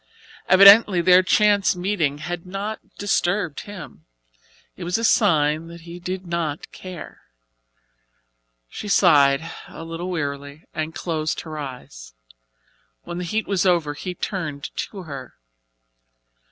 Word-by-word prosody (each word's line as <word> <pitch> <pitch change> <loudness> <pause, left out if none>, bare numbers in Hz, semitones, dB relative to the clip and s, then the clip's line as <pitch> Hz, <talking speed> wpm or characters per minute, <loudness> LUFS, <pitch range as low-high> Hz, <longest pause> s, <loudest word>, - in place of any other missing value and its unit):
Evidently 200 0 +8
their 180 +2 +6
chance 205 +1 +3
meeting 175 -6 -1
had 170 +3 -5
not 200 +4 -5 0.2
disturbed 180 -4 0
him. 155 - -10 0.7
It 185 - -8
was 175 +3 0
a 230 - -4
sign 160 -8 +3
that 170 0 -11
he 170 +1 -10
did 185 +1 -5
not 170 -3 -3
care. 185 -3 -10 1.5
She 210 - -8
sighed 160 -5 +4 0.2
a - - -10
little 165 +2 -5
wearily 145 -2 -4
and 160 0 -4
closed 155 -3 -2
her 155 -2 -8
eyes. 125 - -9 0.9
When 175 - -6
the - - -3
heat 215 +5 -1
was 195 -3 +1
over 170 -6 +2
he 180 +5 -6
turned 160 -8 -5
to 195 -3 -5
her. 140 -6 -9
170 Hz, 125 wpm, -22 LUFS, 150-185 Hz, 1.5 s, Evidently